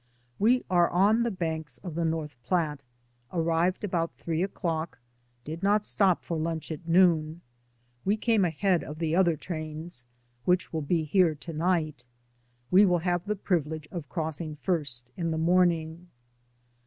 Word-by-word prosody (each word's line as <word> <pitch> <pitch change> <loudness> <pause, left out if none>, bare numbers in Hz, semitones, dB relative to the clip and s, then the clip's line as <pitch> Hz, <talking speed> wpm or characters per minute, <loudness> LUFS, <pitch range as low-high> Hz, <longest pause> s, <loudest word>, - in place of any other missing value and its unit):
We 245 +5 +3
are 175 -2 +3
on 205 +6 +4
the 235 - +1
banks 160 - -4
of 175 - -5
the 170 +1 -1
North 160 -3 -2
Platte; 150 +1 0 0.5
arrived 170 +2 +1
about 170 -4 -1
three 165 0 -2
o'clock, 165 -6 -2 0.5
did 160 +4 -6
not 205 +1 +2
stop 190 -4 +2
for 170 - -3
lunch 165 0 -3
at 160 +2 -7
noon. 165 -2 +3 0.6
We 205 +3 +1
came 225 -2 +2
ahead 180 +1 +1
of 150 - -7
the 165 0 0
other 175 -4 +3
trains, 155 -4 -5 0.4
which 180 +5 +1
will 160 - -1
be 160 +2 +1
here 165 0 +3
to 165 +3 -8
night. 155 -5 0 0.7
We 190 +3 +7
will 180 -3 +4
have 175 +1 0
the 210 - 0
privilege 160 -6 -1
of 165 -6 -6
crossing 160 -2 -3
first 145 -8 -2
in 170 -2 -1
the 160 - -1
morning. 170 0 +2
165 Hz, 155 wpm, -28 LUFS, 155-180 Hz, 0.7 s, We